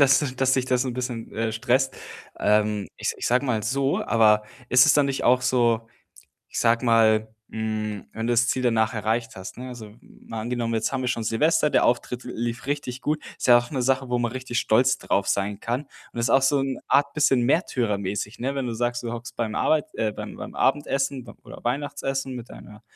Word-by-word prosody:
dass 140 -1 +4
dass 130 0 +2
dich 130 -1 +1
das 125 0 +1
'n 130 - -2
bisschen, 125 -2 -5
äh, 110 0 -1
stresst, 130 +4 +1 0.4
ähm, 105 -1 +1
ich - - -2
s - - 0
ich - - -3
sage 125 +3 +2
mal 115 -4 0
so. 135 +5 0
Aber 105 -2 +4 0.3
ist 125 +1 +7
es 155 - +6
dann 145 0 +4
nicht 135 -1 -2
auch 125 +1 +5
so, 120 -3 +2 0.6
ich - - -5
sage 115 +1 +2
mal, 110 -2 +4 0.2
hm, 110 -2 -3
wenn 110 0 -4
du 120 - +1
das 120 0 +3
Ziel 130 - 0
danach 110 -3 +2
erreicht 115 0 -2
hast, 95 0 -8
ne, 130 +1 -6
also, 110 -4 -10
mal 115 - -9
angenommen, 115 0 -2
jetzt 110 -1 0
haben 135 -1 -1
wir 125 - -1
schon 120 -2 -1
Silvester, 150 +8 +2
der - - +3
Auftritt 125 0 0
lief 120 0 -4
richtig 140 -2 -3
gut. 150 +1 -1 0.2
Ist - - -2
ja 120 -1 +9
auch 120 0 -5
'ne 130 -4 -2
Sache, 130 +1 +1
wo 125 0 0
man 120 0 -1
richtig 130 -2 -3
stolz 125 +5 +3
drauf 100 0 0
sein 100 +1 -1
kann 120 +4 -2 0.3
und - - -8
ist 115 - +1
auch 135 - +5
so 140 +1 +3
'n 135 -1 -2
Art 140 +1 +3
bisschen 140 -4 +3
märtyrermäßig, 105 - -1
ne, 135 +3 -1
wenn 135 -2 -2
du 120 - -3
sagst, 120 +1 -1
du 120 -1 -4
hockst 120 +1 -7
beim 110 -2 -2
Arbeit 155 -2 +2
äh, 110 - 0
beim - - -7
beim - - -8
Abendessen 135 -2 0
b - - -11
oder - - -11
Weihnachtsessen 135 0 -2
mit 120 -1 -8
deiner 105 0 -13
120 Hz, 220 wpm, -24 LUFS, 110-130 Hz, 0.6 s, ja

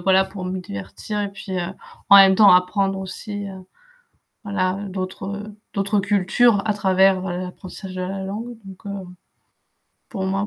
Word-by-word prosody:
voilà 190 +1 +4
pour 190 -1 -7
me 185 +1 -3
divertir 100 - -5
et 200 - -2
puis, 195 0 -8
heu, 175 +1 -3 0.4
en 200 - +11
même 195 -1 +8
temps 205 +1 +7
apprendre 195 +2 +2
aussi, 200 +2 -6
heu, 190 -1 -8 0.9
voilà 185 -3 0 0.2
d'autres, 185 0 -5 0.2
heu, 210 -1 -12 0.2
d'autres 200 +1 +1
cultures 205 +2 +3
à 210 - +2
travers, 190 -1 +3
heu, 175 -1 -3
l'apprentissage 185 +1 -8
de 185 - -3
la 190 +1 -4
langue 220 +5 -5
donc, 190 +2 -12
heu, 200 -2 -5 1.0
pour 195 -5 -4
moi, 195 +2 -1
195 Hz, 165 wpm, -22 LUFS, 185-200 Hz, 1.0 s, en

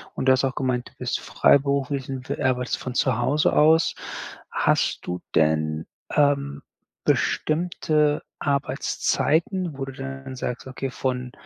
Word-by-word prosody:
Und - - -2
du - - +8
hast 130 - +1
auch 130 - -1
gemeint, 125 -2 -1
du - - -28
bist - - -1
freiberuflich 140 -1 +2
und, 130 -1 -6
äh, - - -3
arbeitest 125 -1 +1
von 130 - -5
zu 130 -4 +2
Hause 135 +5 +2
aus. 160 +2 +5 0.6
Hast - - +1
du 90 0 -3
denn, 80 0 +2 0.3
ähm, 140 -1 +2 0.4
bestimmte 155 -2 +1 0.2
Arbeitszeiten, 160 +4 0
wo 135 - -3
du 135 - -8
dann 135 0 -7
sagst: 125 0 -4
„Okay, 130 0 -4
von, 125 -1 -2
135 Hz, 140 wpm, -24 LUFS, 125-145 Hz, 0.6 s, du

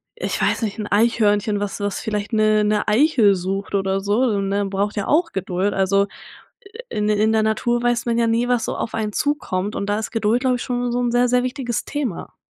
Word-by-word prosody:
äh, 475 - -5
ich - - -3
weiß - - +1
nicht, 210 0 -3
'n 210 - -3
Eichhörnchen, 210 -1 +2
was 205 0 -4
was 205 -1 -2
vielleicht 210 -1 -3
'ne 215 -1 +3
'ne 210 0 0
Eichel 220 -3 +4
sucht 195 +2 -3
oder 195 0 0
so 220 +5 +1
so, 200 - 0
ne? 200 +1 -1
Braucht 200 +2 -2
ja 205 - -1
auch 330 +3 +2
Geduld. 190 +1 -1
Also 195 +1 +2 0.8
in 210 0 -1
der 210 - +2
in 220 +1 +3
der 220 -1 +2
Natur 240 +2 0
weiß 240 0 +1
man 235 0 0
ja 235 - +3
nie, 235 +2 +1
was 245 -2 +1
so - - -3
auf - - -4
einen 215 -2 -2
zukommt, 210 -10 -1
und 200 - -3
da 205 +1 +1
ist 220 - -4
Geduld, 225 +2 +1
glaube 255 -1 +2
ich, - - -5
schon 245 -1 -2
so 245 - 0
'n 245 -1 0
sehr, 245 0 +3
sehr 250 0 +2
wichtiges 250 -2 -3
Thema. 270 - -4
215 Hz, 235 wpm, -21 LUFS, 200-240 Hz, 0.8 s, Eichel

